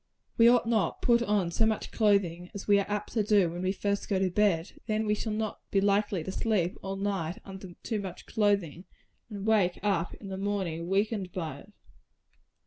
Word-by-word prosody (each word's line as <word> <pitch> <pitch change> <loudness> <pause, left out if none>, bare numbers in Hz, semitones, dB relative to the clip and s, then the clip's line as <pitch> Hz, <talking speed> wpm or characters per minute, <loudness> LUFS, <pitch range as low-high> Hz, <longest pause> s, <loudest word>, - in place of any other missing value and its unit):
We 230 - +6
ought 240 0 +5
not 225 -3 +1
to - - -8
put 235 -1 +5
on 205 -6 +1
so 220 +6 +2
much 220 -1 -2
clothing 190 -5 +1
as 200 - -7
we 205 -1 +5
are 200 - -3
apt 210 0 -3
to 225 - +2
do 205 -5 +3
when 175 +1 -5
we 185 0 +1
first 200 +1 -2
go 200 - +2
to 190 -1 +1
bed 185 -3 +2
and - - -22
then 215 0 0
we 210 - +2
shall 215 +1 -3
not 215 0 -3
be 195 - +2
likely 200 -2 +1
to 190 - -4
sleep 190 -4 0
all 195 0 -4
night 195 -4 -2
under 190 -2 -9
too 220 -3 -2
much 190 -3 -8
clothing, 200 -6 0 0.4
and 200 -2 -6
wake 205 -5 +3
up 190 -5 0
in 200 - -10
the 190 - -4
morning 190 -5 -2
weakened 195 0 0
by 160 -6 -5
it. 205 - -17
200 Hz, 215 wpm, -29 LUFS, 185-210 Hz, 0.4 s, We